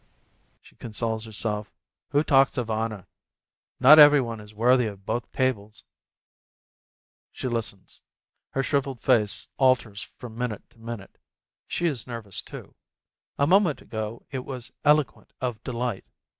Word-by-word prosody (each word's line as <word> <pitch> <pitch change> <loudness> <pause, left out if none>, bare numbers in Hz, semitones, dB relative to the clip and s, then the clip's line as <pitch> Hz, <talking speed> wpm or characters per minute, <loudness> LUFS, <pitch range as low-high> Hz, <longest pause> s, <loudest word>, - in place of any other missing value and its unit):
she - - -21
consoles 110 0 -2
herself, 105 -1 -3 0.4
"who 145 +1 +2
talks 135 -2 +4
of 115 -3 -2
honor? 110 -3 -3 0.7
Not 145 +5 +9
every 145 -1 +9
one 115 -3 -3
is 105 0 -12
worthy 120 +3 +3
of 100 -2 -9
both 120 +2 -3
tables 110 -5 -2 0.7
!" - - -84
She - - -5
listens. 115 -5 -4 0.5
Her 135 - -1
shrivelled 135 -3 -1
face 110 -6 +2
alters 125 -6 +2 0.2
from 120 -3 -9
minute 120 -3 -4
to 115 - -25
minute; 115 -3 -8 0.5
she 175 - -2
is 135 -9 -1
nervous, 115 -6 -5
too. - - -11 0.6
A 140 - +3
moment 180 -2 +3
ago 110 0 -6
it 130 -3 -4
was 125 -3 -6
eloquent 150 -1 +2
of 120 -4 -4
delight. 120 -4 -3
120 Hz, 140 wpm, -26 LUFS, 110-135 Hz, 0.7 s, Not